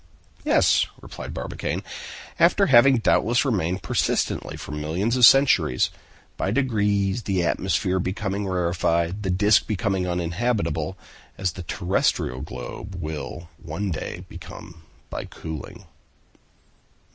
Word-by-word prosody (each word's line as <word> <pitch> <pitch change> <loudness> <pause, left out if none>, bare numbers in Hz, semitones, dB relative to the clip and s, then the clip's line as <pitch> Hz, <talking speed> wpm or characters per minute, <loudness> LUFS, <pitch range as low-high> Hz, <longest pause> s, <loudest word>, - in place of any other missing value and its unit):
"Yes," - - +4
replied - - -8
Barbicane, - - -4 0.6
"after - - +5
having 130 +1 +6
doubtless 115 +2 +2
remained 95 -7 0
persistently - - -1
for - - -8
millions 80 +10 -1
of 125 -2 +8
centuries; 90 - +4 0.5
by - - -1
degrees 105 -4 +1
the 95 -5 0
atmosphere 95 +3 0
becoming 100 +2 -2
rarefied, 85 0 0
the 95 - -2
disc 105 +3 +3
became 105 -1 0
uninhabitable, 85 -1 -1 0.4
as 95 -2 0
the 90 - -8
terrestrial 85 -7 0
globe 95 +9 -7
will 85 +1 -6
one 95 +5 -3
day 80 - -5
become 80 -2 -11 0.3
by - - -4
cooling." 80 -3 -8
95 Hz, 110 wpm, -24 LUFS, 85-105 Hz, 0.6 s, of